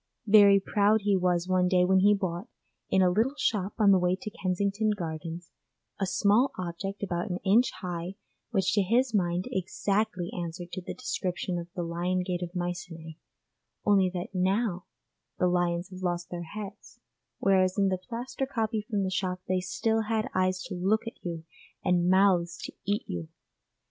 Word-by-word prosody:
Very 200 -2 +7
proud 205 +2 +2
he 205 -1 +2
was 180 -1 +1
one 185 -1 +3
day 180 0 +4
when 190 +1 +4
he 205 +2 +5
bought, 185 +1 -3 0.4
in 190 0 +4
a 180 - +4
little 230 +9 +1
shop 200 -6 0
on 210 -3 +5
the 190 - +5
way 180 0 +2
to 215 - -6
Kensington 200 +3 0
Gardens, 165 0 -6 0.5
a 195 - 0
small 205 +7 +3
object 185 +3 -5
about 180 +1 -2
an 180 - -1
inch 225 +6 +5
high 175 +1 -4 0.3
which 195 -4 +1
to 205 - +4
his 235 +5 +2
mind 180 -3 +1
exactly 190 0 -1
answered 175 0 -5
to 185 - -5
the - - -6
description 185 -7 -2
of 170 - -7
the 175 - -2
lion 175 +2 -1
gate 180 -1 -3
of 175 -1 -5
Mycenæ, 175 -3 -5 0.7
only 195 -3 +4
that 180 +1 -5
now 190 0 0 0.5
the - - +2
lions 175 +1 0
have 185 0 -9
lost 175 -1 -2
their 175 -1 -5
heads, 205 -1 -8 0.4
whereas 185 -1 +2
in 195 -1 +3
the 185 -1 -1
plaster 245 +6 -4
copy 225 -4 -1
from 210 -2 -2
the 190 - -1
shop 185 0 -2
they 185 0 +1
still 220 +5 0
had 220 0 0
eyes 185 0 +1
to - - -6
look 195 +6 +1
at 230 - -9
you 170 -2 -4 0.4
and 175 0 +3
mouths 185 -3 +3
to - - -6
eat 205 +1 0
you. 85 -2 -5
185 Hz, 180 wpm, -28 LUFS, 175-205 Hz, 0.7 s, Very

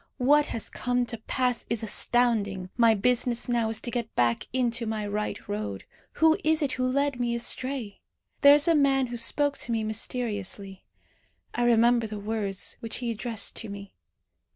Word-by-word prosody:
What 290 +3 +3
has 225 - -4
come 245 -1 -1
to 230 -1 -5
pass 250 +2 -1
is 230 -1 -2
astounding. 210 -4 +1
My 230 -2 +4
business 245 +2 +1
now 235 -2 0
is 225 - -1
to 240 - -4
get 235 -2 -4
back 120 -1 +1
into 240 -2 -1
my 215 -1 -3
right 210 +1 -4
road. 100 -2 -4 0.3
Who 320 +1 +3
is 315 0 +2
it 275 - 0
who 255 0 -1
led 280 0 0
me 240 -1 0
astray? 240 -2 -2 0.4
There 285 0 +8
is 295 +3 +2
a 335 - +5
man 275 -3 +3
who 240 -1 -6
spoke 285 +5 0
to 235 - -3
me 225 -1 0
mysteriously. 205 -3 -3 0.7
I 240 - 0
remember 235 0 +3
the 215 0 -6
words 205 -2 -2
which 230 - -5
he 240 -2 -3
addressed 225 0 0
to 225 - -6
me. 200 0 -9
235 Hz, 175 wpm, -26 LUFS, 215-255 Hz, 0.7 s, There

